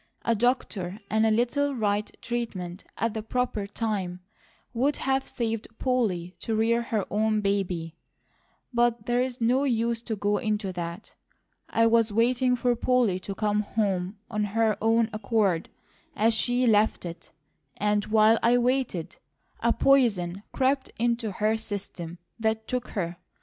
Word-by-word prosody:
A 230 - +3
doctor 210 -5 -1
and 220 +1 +3
a - - +4
little 260 +6 +1
right 210 -2 0
treatment 200 -7 -4
at 230 -1 0
the 220 - -3
proper 220 -2 -2
time 200 -5 -3 0.5
would 270 +5 +1
have 270 0 0
saved 225 -2 -3
Polly 205 -9 0
to 225 - -2
rear 230 +2 +2
her 220 -4 -1
own 215 +1 +2
baby; 185 -5 -1 0.8
but 240 -2 +2
there's 245 +1 0
no 245 +4 +2
use 235 -3 0
to 230 -2 -3
go 205 0 0
into 210 -4 -1
that. 170 +3 -6 0.6
I 230 - +3
was 230 -1 +4
waiting 250 +3 +2
for 245 0 +1
Polly 235 -6 +2
to 195 +1 -6
come 210 0 +1
home 200 -2 -1
of 210 -2 -1
her 220 +1 +1
own 225 +1 +3
accord, 205 -5 +1 0.5
as 225 +2 +3
she 245 +3 +2
left 215 -4 +3
it; 170 0 -8 0.5
and 210 0 +1
while 220 +1 +5
I 240 +1 +4
waited, 245 -8 0 0.4
a 235 - +2
poison 200 -10 +3
crept 265 +1 +1
into 235 -1 0
her 215 +3 +1
system 190 -5 -6 0.2
that 220 0 0
took 250 -1 -2
her. 170 -2 -2
220 Hz, 145 wpm, -27 LUFS, 200-240 Hz, 0.8 s, while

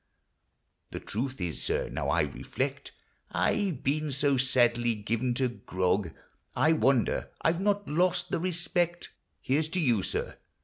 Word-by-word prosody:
The - - -5
truth 130 +4 -3
is, 85 -4 -3
sir, - - 0
now - - -1
T - - +3
reflect, - - -4 0.4
I 205 -2 +1
've 145 -8 -6
been 150 +2 0
so 140 +1 +2
sadly 120 -2 +3
given 115 +4 -1
to 130 +1 +2
grog, 95 -5 -1 0.5
I 160 - +4
wonder 135 -5 +2
I 160 - +5
've 170 - -3
not 205 0 +1
lost 175 +4 +1
the - - +1
respect 175 0 -1 0.3
(Here 140 +4 +1
's 155 - -2
to 185 - -1
you, 120 - +3
sir - - -3
135 Hz, 160 wpm, -29 LUFS, 120-165 Hz, 0.5 s, I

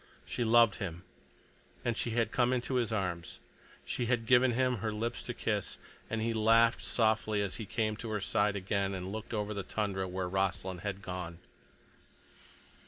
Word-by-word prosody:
She 120 - -2
loved 115 -2 +5
him, 90 -4 -5 0.8
and 120 -2 +1
she 120 - -1
had 115 0 +1
come 125 -1 +2
into 125 +1 -1
his 120 -3 +1
arms. 90 -5 -2 0.5
She 120 - -2
had 120 -1 +1
given 125 +1 +5
him 125 0 +2
her 110 +1 -2
lips 115 +3 -2
to 120 - -4
kiss. 105 -3 -1 0.3
And 115 -1 -1
he 115 0 0
laughed 115 +1 +4
softly 110 -2 +2
as 100 - -2
he 110 - -6
came 110 -1 0
to 115 0 -6
her 105 -1 -1
side 105 +1 +1
again, 100 0 -1
and 95 0 -5
looked 110 0 -6
over 105 -1 -1
the 100 - -2
tundra 95 -1 -2
where 90 0 -2
Rossland 95 -1 -1
had 100 -1 -4
gone. 90 -4 -5
110 Hz, 175 wpm, -32 LUFS, 95-115 Hz, 0.8 s, loved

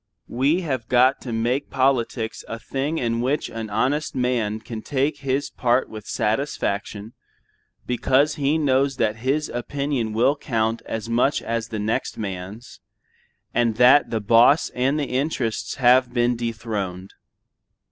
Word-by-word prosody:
We 140 +9 +1
have 130 -9 -3
got 125 +2 +3
to 125 - -6
make 120 +5 -1
politics 130 -4 0
a 115 - -5
thing 135 +7 -3
in 115 -3 -1
which 135 +5 -1
an 115 -1 -5
honest 135 +8 0
man 120 -4 0
can 110 0 -7
take 145 +3 -1
his 135 +1 -2
part 125 +1 +1
with 110 -1 -9
satisfaction 105 -2 -2 0.7
because 130 +4 +2
he 145 +2 +1
knows 135 -2 +2
that 110 0 0
his 135 +6 0
opinion 125 -2 -2
will 120 +6 +3
count 115 -5 -1
as 110 -1 -4
much 120 +5 +1
as 115 -1 -2
the 110 - -5
next 105 +2 -2
man's, 100 +3 -7 0.7
and 120 -2 +1
that 125 +5 +6
the 115 - -1
boss 115 +8 +4
and 135 +4 0
the 145 - 0
interests 130 -4 -2
have 125 0 +4
been 120 0 +1
dethroned. 110 -5 -4
120 Hz, 145 wpm, -23 LUFS, 115-135 Hz, 0.7 s, that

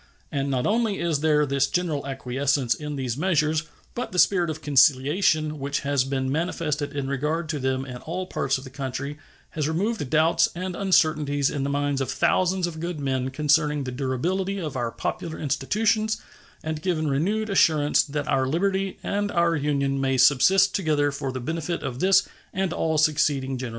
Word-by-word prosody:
And 140 0 -1
not 130 -2 0
only 220 -2 +1
is 165 -4 0
there 150 -1 +3
this 140 -1 +1
general 155 -4 -2
acquiescence 135 -1 0
in 150 +3 -6
these 130 -3 -3
measures, 155 -2 +1 0.3
but 245 - -4
the 180 - -5
spirit 180 -2 +4
of 155 0 -5
conciliation 150 +3 +3
which 140 +1 -2
has 140 -2 +1
been 130 0 -2
manifested 150 -2 -2
in 140 -2 -2
regard 150 +5 -1
to 155 -2 -2
them 130 0 -1
in 125 -2 -7
all 175 +8 -5
parts 135 -7 -1
of 130 - -10
the 130 - -10
country 140 +2 -5 0.3
has 150 -2 -2
removed 180 - -1
doubts 160 +3 +3
and 180 +1 -4
uncertainties 155 -7 +2
in 140 - -2
the 140 - -1
minds 145 -1 0
of 130 - -2
thousands 185 +6 +1
of 165 -2 -6
good 170 -1 -4
men 130 -2 -1
concerning 150 +1 +1
the 130 - -4
durability 165 +10 -2
of 155 -7 -5
our 120 -2 -1
popular 160 +7 -4
institutions 215 - 0 0.4
and 155 -1 -4
given 160 -3 -1
renewed 200 +10 0
assurance 155 -6 +4
that 145 0 -4
our 130 -1 +1
liberty 190 +5 0
and 205 0 -1
our 170 -1 +2
Union 140 -2 0
may 135 -1 +1
subsist 185 +10 +5
together 150 -7 +1
for 140 -1 -4
the 130 - -5
benefit 165 +6 -3
of 130 -3 -4
this 190 +2 +4 0.3
and 190 -2 -1
all 160 -1 0
succeeding 145 -3 +1
generations. 125 -1 -4
150 Hz, 180 wpm, -25 LUFS, 135-170 Hz, 0.4 s, subsist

